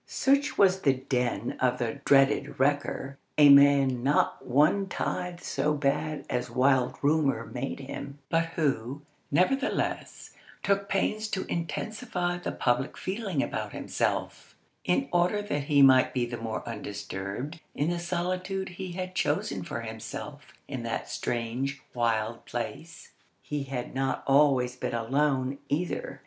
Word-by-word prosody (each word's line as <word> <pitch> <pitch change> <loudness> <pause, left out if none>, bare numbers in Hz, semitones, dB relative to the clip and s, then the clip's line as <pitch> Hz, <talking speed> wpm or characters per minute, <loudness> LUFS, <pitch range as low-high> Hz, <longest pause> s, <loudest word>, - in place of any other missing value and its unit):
Such 280 +1 +2
was 190 -1 +4
the 135 -6 +4
den 125 -4 -2
of 125 -1 +2
the 120 +3 -3
dreaded 135 -1 +3
wrecker, 140 0 0 0.2
a 145 -1 +8
man 140 -3 +6
not 140 +4 +1
one 150 +10 +3
tithe 180 -1 -3
so 150 +2 0
bad 145 +1 -1
as 125 0 -2
wild 130 -1 +2
rumour 145 -1 +2
made 135 +2 -5
him, 140 +1 -7
but 165 +2 +2
who, 140 -2 -1 0.3
nevertheless, 260 - 0 0.3
took 200 0 +1
pains 215 +2 0
to 190 -3 -3
intensify 175 +1 -3
the - - -3
public 125 +2 0
feeling 190 -6 -2
about - - -4
himself, - - -2 0.3
in 270 +10 +1
order 175 +4 +3
that 145 -9 -2
he 145 -2 +5
might 130 -1 +6
be 125 -1 +1
the 120 0 -5
more 115 -2 -5
undisturbed 105 - -5 0.2
in 150 +4 0
the 175 - -2
solitude 185 +2 -2
he 180 0 -6
had 185 0 -4
chosen - - 0
for - - -5
himself - - -7 0.2
in - - -4
that - - -3
strange, 125 +4 -2
wild 115 -1 0
place. 140 +7 -6 0.3
He 145 -2 -3
had 130 -2 -5
not 135 0 -1
always 135 -3 +4
been 125 - -3
alone, 135 +2 0
either. 165 +5 -2
140 Hz, 140 wpm, -28 LUFS, 130-175 Hz, 0.3 s, a